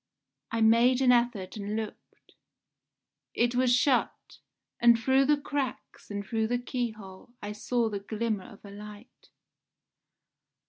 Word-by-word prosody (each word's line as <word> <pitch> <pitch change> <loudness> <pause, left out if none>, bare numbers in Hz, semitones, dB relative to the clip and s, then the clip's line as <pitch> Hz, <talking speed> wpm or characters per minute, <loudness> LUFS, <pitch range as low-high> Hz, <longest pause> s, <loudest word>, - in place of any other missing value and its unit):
I 230 - -2
made 235 +3 +5
an 255 -2 +5
effort 235 -6 0
and 205 +1 -4
looked. 220 -1 -8 1.0
It 240 +1 +2
was 250 0 +2
shut, 255 +1 +1 0.4
and 235 -1 +6
through 265 +4 +3
the 295 +1 +3
cracks 285 -2 -5
and 205 -1 -4
through 220 +2 -1
the 245 +2 0
keyhole 230 -4 -6
I 205 - -6
saw 230 +3 -1
the 205 -2 -3
glimmer 215 0 -3
of 215 -4 -14
a 200 - -10
light. 210 +2 -12
230 Hz, 135 wpm, -28 LUFS, 210-245 Hz, 1.0 s, and